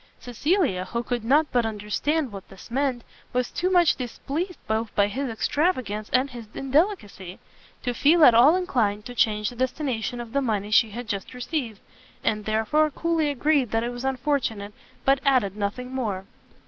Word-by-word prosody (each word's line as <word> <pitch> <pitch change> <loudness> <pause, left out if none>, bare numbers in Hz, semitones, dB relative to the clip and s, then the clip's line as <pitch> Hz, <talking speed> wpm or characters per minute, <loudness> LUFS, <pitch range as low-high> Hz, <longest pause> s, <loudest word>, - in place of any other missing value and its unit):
Cecilia, 245 - 0
who 235 +5 -3
could 240 -2 -3
not 290 +6 +3
but 245 -1 +2
understand 225 +7 -1
what 195 -2 -10
this 195 +4 -14
meant, 260 -2 0 0.3
was 250 0 0
too 365 - -1
much 350 -3 +4
displeased 290 - -4
both 220 +1 -1
by 205 - +4
his 255 +6 -3
extravagance 225 - -1
and 255 +2 +2
his 235 -3 -9
indelicacy, 270 - -1 0.5
to 245 - -1
feel 305 +6 +5
at 240 - +8
all 255 +9 +7
inclined 230 - 0
to 245 - -7
change 210 -3 +1
the - - -11
destination 250 -2 -2
of 235 -1 -8
the 280 - +2
money 210 -5 -1
she 220 +1 +5
had 235 +3 -7
just 200 +4 -4
received; 245 -4 -4 0.4
and 210 -2 0
therefore 225 +9 +2
coolly 325 +1 0
agreed 285 -2 +1
that 225 +1 0
it 240 - -2
was 245 +1 -7
unfortunate, 255 -6 -1 0.3
but 275 0 +4
added 250 -8 +2
nothing 215 +5 -4
more. 205 -7 -3
245 Hz, 175 wpm, -25 LUFS, 215-280 Hz, 0.5 s, at